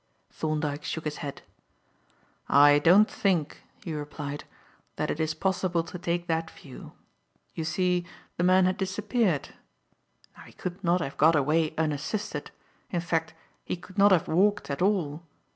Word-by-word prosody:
Thorndyke 155 -2 -2
shook 160 - -4
his 150 -1 -3
head. 140 -2 -7 1.1
"I 145 +1 +7
don't 185 +8 +6
think," 175 -7 -1 0.2
he 165 - -4
replied, 145 -1 -6 0.5
"that - - -1
it 150 - -4
is 155 -1 0
possible 185 -3 0
to 170 +2 -8
take 175 0 -2
that 165 -1 -1
view. 135 -5 -12 0.6
You 160 - -4
see 180 +2 0 0.3
the 175 - -1
man 185 +1 +5
had 185 0 +1
disappeared. 195 - 0 0.9
Now - - -14
he - - -15
could 180 +2 -6
not 175 +1 +2
have 135 -4 -5
got 160 +2 +5
away 155 +2 +1
unassisted, 160 +7 -2 0.4
in 175 - -1
fact 170 -2 -1 0.3
he - - -3
could 185 +3 -9
not 200 +1 +7
have 180 -4 +3
walked 200 0 +2
at 140 - -4
all. 175 -6 +1
170 Hz, 155 wpm, -27 LUFS, 150-185 Hz, 1.1 s, I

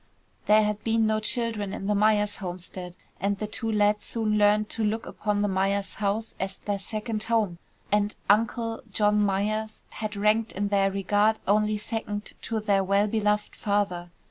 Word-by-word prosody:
There 215 +1 +6
had 210 0 -2
been 225 0 +2
no 215 0 +2
children 215 -3 -1
in - - -5
the 210 - +1
Myers 210 0 +2
homestead, 180 -1 -6 0.2
and 200 +2 0
the 215 - -3
two 225 +2 -2
lads 210 0 +2
soon 220 -2 0
learned 210 0 +4
to 225 - -2
look 220 +2 -1
upon 205 -1 -1
the - - +2
Myers' 195 +1 0
house 210 +2 -2
as 190 0 -2
their 205 -1 -3
second 215 +2 -3
home, 215 -6 0 0.3
and 210 0 +1
"Uncle" 225 +2 +1
John 210 0 +3
Myers 215 +2 -1
had 215 -1 -5
ranked, 215 +2 +2
in 200 +1 -1
their 195 -1 +3
regard, 205 +3 +2
only 210 +1 +3
second 210 -1 -4
to 225 - -2
their 200 -2 +2
well 200 +2 +3
beloved 210 -1 0
father. 200 -4 -1
210 Hz, 170 wpm, -26 LUFS, 200-215 Hz, 0.3 s, There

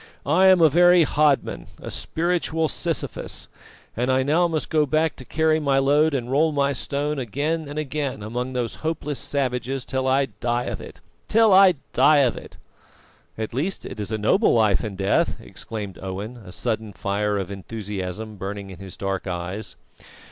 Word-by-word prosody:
I 180 +7 +4
am 185 -2 +6
a 160 - +8
very 175 +3 +6
hodman, 150 -2 +1
a - - -7
spiritual 165 -1 0
Sisyphus. 165 0 -4 0.5
And 125 +2 -1 0.2
now 160 +5 +3
I - - +3
must 160 -2 -3
go 155 -2 +3
back 155 +2 +1
to 130 - -8
carry 160 +3 +2
my 140 -3 +1
load 145 +3 +3
and 125 -1 -3
roll 155 +4 +3
my 140 -1 +1
stone 145 +3 -2
again 145 +6 -2
and 145 +1 -7
again 145 -6 -3
among 125 +4 -3
those 120 -2 -2
hopeless 155 -3 -2
savages 130 -1 -2
till 130 0 -1
I 135 0 +2
die 120 0 0
of - - -5
it - - -11 0.3
till 225 -2 +5
I 190 -2 +7 0.2
die 150 -2 +5
of 120 - 0
it!" - - -11 0.8
"At 110 0 -4
least 160 +10 -2
it - - -7
is 105 +1 -4
a 110 - 0
noble 185 - +3
life 110 -2 +3
and 105 -4 -5
death!" 95 0 +1
exclaimed 105 -4 -7
Owen, 95 +5 -5
a 100 -6 -12
sudden 110 +2 -3
fire 100 +2 -1
of 95 -1 -4
enthusiasm 100 +1 -6
burning 100 +1 -6
in 95 - -11
his 95 -2 -10
dark 95 0 -3
eyes. 90 +4 -4
130 Hz, 175 wpm, -23 LUFS, 105-155 Hz, 0.8 s, a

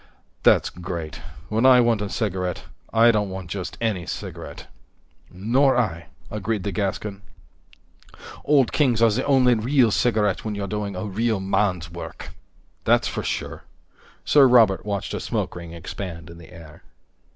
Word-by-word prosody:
"That's - - +4
great. 85 -3 -6 0.3
When 110 +2 0
I 130 -1 +7
want 115 -3 +2
a 105 - -3
cigarette, 95 -5 -2 0.3
I 115 +1 +6
don't 105 -3 0
want 95 -3 -7
just 95 -3 -5
any 105 -7 -2
cigarette." - - -7 0.6
"Nor 125 +8 +2
I," 85 -8 -1 0.2
agreed 105 -1 -2
the 100 - -2
Gascon. 100 +1 -3 1.2
"Old 140 -5 +3
Kings 125 -6 +2
is 110 -1 +4
the - - -1
only 130 -3 +4
real 120 +1 +2
cigarette 105 -6 +1
when 110 -2 -3
you're 100 -1 -3
doing 100 0 -4
a 90 - -4
real 110 +1 -1
man's 95 -3 -1
work." 85 - -8 0.5
"That's - - +3
for - - -3
sure." - - -4 0.6
Sir 140 -2 +6
Robert 110 -6 +4
watched 100 -2 -3
a - - -2
smoke - - -3
ring 85 -1 -8
expand 85 0 -7
in 85 - -12
the 85 - -14
air. 80 -3 -13
105 Hz, 155 wpm, -23 LUFS, 90-115 Hz, 1.2 s, I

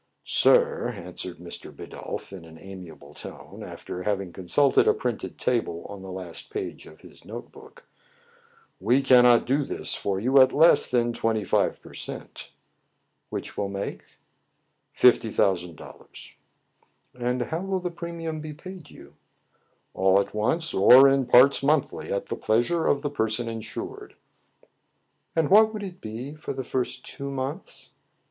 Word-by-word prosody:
"Sir," 475 -1 +3
answered 90 -2 -7
Mr. 85 0 -8
Bidulph - - -8
in 95 -3 -9
an 80 0 -14
amiable 85 -6 -11
tone, - - -11
after 90 - -7
having 95 -3 -2
consulted 130 +10 +2
a - - +4
printed 115 -7 -4
table 115 -9 -1
on 100 -1 -9
the 95 0 -8
last 90 -2 -7
page 410 -2 -6
of - - -16
his - - -16
note - - -9
book, 485 0 -16 0.5
" 465 -1 -33
we 130 +3 +4
cannot 125 -2 +6
do 140 +4 +1
this - - -1
for 95 -1 -2
you 130 +5 +5
at 130 - +5
less 160 +3 +5
than 120 -1 +1
twenty 110 -2 0
five 90 - +1
per - - -13
cent." - - -8 0.4
" - - -49
Which - - -6
will 100 -1 -2
make.? 100 0 -6 0.2
" - - -48
" - - -49
Fifty 120 -2 +4
thousand 90 -5 0
dollars." - - -12 0.4
" - - -40
And 125 0 -2
how 160 +6 -4
will 195 0 -2
the 180 -1 -4
premium 170 -2 -6
be 155 0 -7
paid 175 -1 -11
you - - -15 0.3
} - - -46
" - - -42
" - - -45
All 95 +1 +3
at 100 0 -3
once, 160 +11 0
or 125 +8 +8
in 135 -2 +1
parts 125 +3 +6
monthly, 140 0 0
at 100 - -1
the - - -4
pleas 115 +2 +1
ure 170 -2 0
of 140 +1 +1
the 145 - -2
person 110 -2 -1
insured." 115 -1 -7 1.2
"And 165 -1 +1
what 220 +2 +7
would 215 -2 -6
it 185 -2 -8
be 115 +6 -6
for 155 -2 -6
the 130 0 -4
first 125 0 -3
two 140 0 -6
months 135 +6 -5
125 Hz, 175 wpm, -25 LUFS, 100-155 Hz, 1.2 s, or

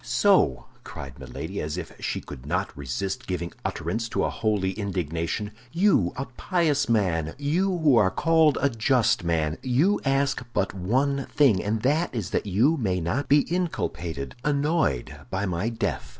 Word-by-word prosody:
"So," 120 - +3 0.2
cried 65 -2 -9
Milady, - - -5
as 75 +2 -3
if 90 - -6
she - - -2
could 60 - -10
not - - -1
resist 70 +8 -4
giving 85 -2 -3
utterance 110 +9 -2
to - - 0
a - - 0
holy 105 -4 0
indignation, 95 0 -3 0.2
"you, 170 - +3
a 135 - -3
pious 145 +1 0
man, 85 -8 +1
you 150 +7 +1
who 150 -7 +4
are 105 -4 +5
called 160 - +3
a 140 - +3
just 115 -2 +2
man, 80 -2 0
you 145 +11 +2
ask 135 -1 +1
but 100 -1 0
one 130 +9 0
thing—and 110 -5 +2
that 150 +3 +1
is 110 -6 -3
that - - -1
you 120 - +3
may 95 -8 0
not 115 - -2
be 145 +1 +6
inculpated, 85 - -3
annoyed, 145 - 0
by 95 +2 -1
my 90 +4 -1
death!" 115 - -3
110 Hz, 160 wpm, -25 LUFS, 90-140 Hz, 0.2 s, be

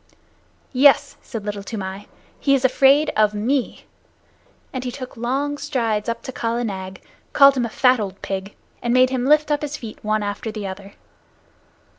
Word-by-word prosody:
"Yes," 280 +2 +4
said 220 -4 -7
Little 205 -1 -4
Toomai, 200 -1 -6 0.3
"he 275 -1 +3
is 265 -1 0
afraid 275 +3 +4
of 210 -1 +3
me," 250 +5 -1 0.9
and 255 -1 -4
he 250 - -3
took 255 0 -8
long 275 +5 -2
strides 235 -7 -1
up 230 0 -4
to 260 - -6
Kala 235 -1 -2
Nag, 190 -3 -5 0.3
called 275 -1 +7
him 250 -2 0
a - - -4
fat 250 +2 +3
old 195 -2 -5
pig, 195 +1 -4 0.3
and 240 +1 0
made 255 0 +5
him 255 -1 -1
lift 300 +1 +4
up 290 - +1
his 295 0 -4
feet 225 -4 -9
one 215 0 0
after 205 +2 -4
the 215 -2 -6
other. 195 +1 -8
240 Hz, 175 wpm, -21 LUFS, 210-270 Hz, 0.9 s, called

